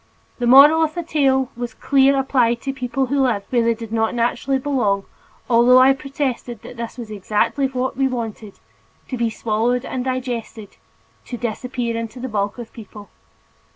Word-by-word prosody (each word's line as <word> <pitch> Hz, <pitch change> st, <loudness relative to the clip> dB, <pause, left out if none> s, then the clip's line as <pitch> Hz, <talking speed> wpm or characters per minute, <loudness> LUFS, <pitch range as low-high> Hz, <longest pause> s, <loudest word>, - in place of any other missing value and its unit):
The 240 Hz, -, 0 dB
moral 285 Hz, +6 st, +8 dB
of 310 Hz, +1 st, -2 dB
the 345 Hz, -, -3 dB
tale 270 Hz, -4 st, +1 dB
was 240 Hz, +1 st, -6 dB
clear 275 Hz, 0 st, +3 dB
applied 250 Hz, -3 st, +1 dB
to 270 Hz, -, -3 dB
people 265 Hz, 0 st, -2 dB
who 275 Hz, +2 st, 0 dB
lived 230 Hz, -7 st, 0 dB
"where 245 Hz, -2 st, +3 dB
they 230 Hz, 0 st, +2 dB
did 225 Hz, -1 st, -8 dB
not 225 Hz, +1 st, 0 dB
naturally 245 Hz, +3 st, 0 dB
belong," 245 Hz, -8 st, 0 dB, 0.4 s
although 240 Hz, +1 st, +5 dB
I 260 Hz, +1 st, +6 dB
protested 270 Hz, -4 st, -4 dB
that 235 Hz, 0 st, -7 dB
was 230 Hz, -3 st, -8 dB
exactly 215 Hz, +6 st, 0 dB
what 260 Hz, 0 st, -3 dB
we 270 Hz, +1 st, +1 dB
wanted 225 Hz, -5 st, -5 dB, 0.5 s
to -, -, -3 dB
be 235 Hz, -2 st, 0 dB
swallowed 235 Hz, +3 st, -1 dB
and 255 Hz, -, -4 dB
digested, 245 Hz, -4 st, -5 dB, 0.5 s
to 245 Hz, -, -6 dB
disappear 240 Hz, +1 st, -3 dB
into 230 Hz, +2 st, -5 dB
the 260 Hz, -, -4 dB
bulk 205 Hz, 0 st, -2 dB
of 240 Hz, -, -6 dB
the -, -, -36 dB
people. 210 Hz, -2 st, -12 dB
245 Hz, 175 wpm, -20 LUFS, 230-265 Hz, 0.5 s, moral